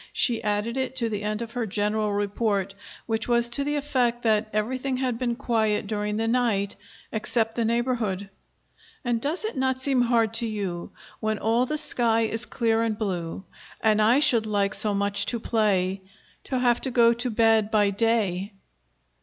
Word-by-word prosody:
She 235 -3 +2
added 210 +4 -1
it 265 0 -2
to 235 -3 0
the 210 -2 -3
end 210 +2 -2
of 230 - -9
her 235 -2 -3
general 210 +1 0
report, 200 -1 -1 0.3
which 225 -1 -2
was 235 -1 +3
to 260 +4 +4
the 295 +1 -1
effect 250 -5 0
that 215 -1 +2
everything 255 +5 -1
had 250 -3 -2
been 240 -2 -1
quiet 220 -5 0
during 210 0 -2
the 225 0 0
night 225 -5 0 0.4
except 225 +1 -1
the 230 0 -1
neighborhood. 230 -4 -1 0.8
"And 235 -2 0
does 320 - -2
it 440 - -4
not 260 -1 0
seem 260 -1 +2
hard 230 -2 +2
to 230 0 0
you, 195 -5 -4 0.3
When 220 -1 -1
all 230 +4 +1
the 305 - -1
sky 230 -6 +2
is 225 +1 -1
clear 225 -2 +1
and 225 -2 -1
blue, 180 -4 -3 0.4
And 215 -1 +3
I 235 +6 +4
should 235 -7 +4
like 200 -1 0
so 210 -2 +1
much 200 +1 +1
to 235 - -1
play, 195 -4 0 0.4
To 260 - -2
have 245 -1 +2
to 265 - -1
go 235 -2 +4
to 240 +2 -2
bed 225 -1 +3
by 210 -2 +3
day?" 205 -2 0
225 Hz, 180 wpm, -25 LUFS, 210-240 Hz, 0.8 s, to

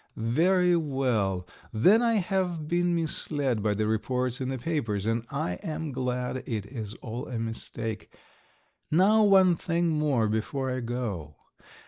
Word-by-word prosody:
"Very 175 +10 +3
well, 125 - 0 0.2
then 185 - +5
I 235 -1 +3
have 180 -5 -1
been 175 +1 +1
misled 145 -7 -1
by 105 0 +1
the 110 +1 0
reports 125 +4 -1
in 130 - -2
the 135 - -2
papers, 115 -8 -2
and 115 +1 -1
I 90 0 -3
am 155 -1 -4
glad 125 0 -2
it 110 -4 -3
is 110 -2 -6
all 120 +1 -5
a 125 - -4
mistake. 115 -1 -5 0.8
Now 195 +7 +5
one 190 -4 +6
thing 170 +1 0
more 150 -8 +1
before 130 +5 -2
I 130 - -2
go. 115 -11 -4
130 Hz, 145 wpm, -28 LUFS, 110-165 Hz, 0.8 s, one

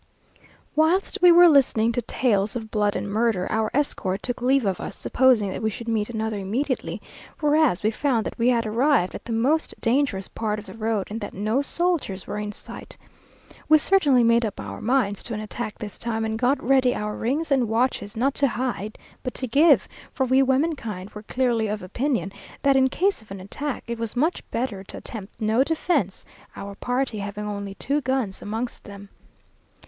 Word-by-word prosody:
Whilst 325 +5 +2
we 355 -1 +8
were 350 +1 +8
listening 245 -7 +4
to 245 - -1
tales 210 -4 0
of 220 -2 -5
blood 210 -1 +1
and - - -3
murder, 215 -2 +1
our 220 0 +1
escort 205 -9 -1
took 245 0 -2
leave 260 0 +3
of 190 -2 0
us, - - -6
supposing 240 -6 +3
that - - -5
we 220 - +1
should 230 +2 -8
meet 220 -2 0
another 220 -2 -2
immediately, 250 +8 -2 0.4
whereas 300 - +3
we 215 - +2
found 235 -2 0
that - - -6
we 230 - +3
had 235 -2 +3
arrived 230 -3 +2
at - - -8
the - - -6
most 265 +8 +1
dangerous 230 -6 +1
part 215 -2 -3
of 210 - -8
the - - -10
road, 220 -3 -1
and 225 +2 -4
that 205 - -6
no 215 +7 0
soldiers 315 - -1
were 210 - -4
in 210 0 -3
sight. - - -10 0.7
We 310 - +8
certainly 295 -7 +4
made 230 +1 +4
up 215 -3 -3
our 100 -1 -7
minds 225 -5 +1
to 230 - -5
an - - -4
attack 215 +1 -5
this 210 -2 -7
time, 225 -1 -2
and 220 0 -2
got 255 +4 +1
ready 260 0 +3
our 210 0 -3
rings 285 +7 -2
and 255 -5 +2
watches, 225 -2 0
not 265 +4 +2
to 280 - +5
hide, 240 -4 -3 0.2
but 255 - -5
to 260 - -3
give, 275 - +4 0.2
for 265 - 0
we 260 +1 +4
womenkind 260 - -1
were 210 - -9
clearly 235 -1 0
of 210 -2 -3
opinion, 230 - -1 0.3
that 275 -1 +4
in 265 0 +4
case 385 - 0
of 215 - -20
an 195 0 -7
attack, 270 +9 -5
it 235 -1 -5
was 230 0 -3
much 310 +8 +1
better 230 -5 -3
to - - -9
attempt 215 -1 -8
no 220 +3 +3
defence, 310 - -1 0.3
our 200 0 -7
party 245 +1 -2
having 205 +1 -5
only 200 -1 -5
two 285 +7 -1
guns 260 -7 -2
amongst 225 +4 -4
them. 200 0 -10
230 Hz, 195 wpm, -24 LUFS, 210-270 Hz, 0.7 s, we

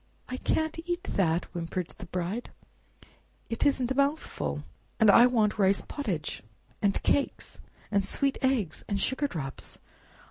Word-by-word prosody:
"I 255 - -4
can't 315 +4 0
eat 350 +1 -1
that!" 175 - +1
whimpered 175 0 -3
the - - -8
Bride; 185 +7 -3 1.0
"it 230 +5 +2
isn't 260 -3 +1
a - - +3
mouthful; 275 - -1 0.4
and 220 -2 +7
I 240 +4 +8
want 220 -4 +1
rice 195 0 +3
pottage, 190 - -3 0.4
and 200 -1 +1
cakes, 285 - 0 0.3
and 200 -1 +3
sweet 275 +7 +1
eggs, 245 - +1
and 200 -1 -1
sugar 265 +6 +1
drops. 135 - -6
215 Hz, 140 wpm, -29 LUFS, 180-270 Hz, 1.0 s, I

